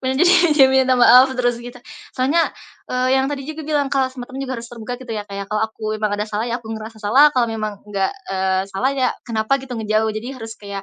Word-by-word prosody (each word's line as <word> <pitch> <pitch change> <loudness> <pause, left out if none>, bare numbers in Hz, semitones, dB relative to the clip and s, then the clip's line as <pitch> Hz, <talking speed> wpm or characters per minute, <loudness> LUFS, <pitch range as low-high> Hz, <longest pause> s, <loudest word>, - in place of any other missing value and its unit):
Bener, 260 0 -1
jadi, 355 +1 +6 0.2
dia 270 -3 +8
minta 260 -1 +3
maaf 250 +2 +7
terus, 245 -1 +1
gitu. 245 +1 -9 0.4
Soalnya, 285 +6 +2 0.4
eee, 255 0 0
yang 265 - +2
tadi 280 -2 -4
juga 315 +2 -7
bilang, 290 -2 0
kalau 270 -2 +2
sama 260 -1 -8
temen 265 +1 -7
juga 260 -1 -4
harus 230 - -7
terbuka 240 +1 -7
gitu 250 -3 -7
ya, 210 -1 -4
Kak, 200 - -7
ya. 200 - -4
Kalau 210 +1 -1
aku 220 - -20 0.2
memang 215 -1 0
ada 210 - -2
salah, 215 +1 -2
ya 235 - -1
aku 225 - -12
ngerasa 220 0 -8
salah, 260 +9 +5
kalau 250 -3 +2
memang 215 -2 -4
enggak, 200 -2 -1 0.2
eee, 190 0 0
salah 250 +8 0
ya 255 -2 +2 0.2
kenapa, 220 +4 +1
gitu, 265 -1 -9
ngejauh. 220 0 0
Jadi 215 +2 -5
harus 225 -2 -7
kayak 200 -1 -6
240 Hz, 245 wpm, -20 LUFS, 215-265 Hz, 0.4 s, dia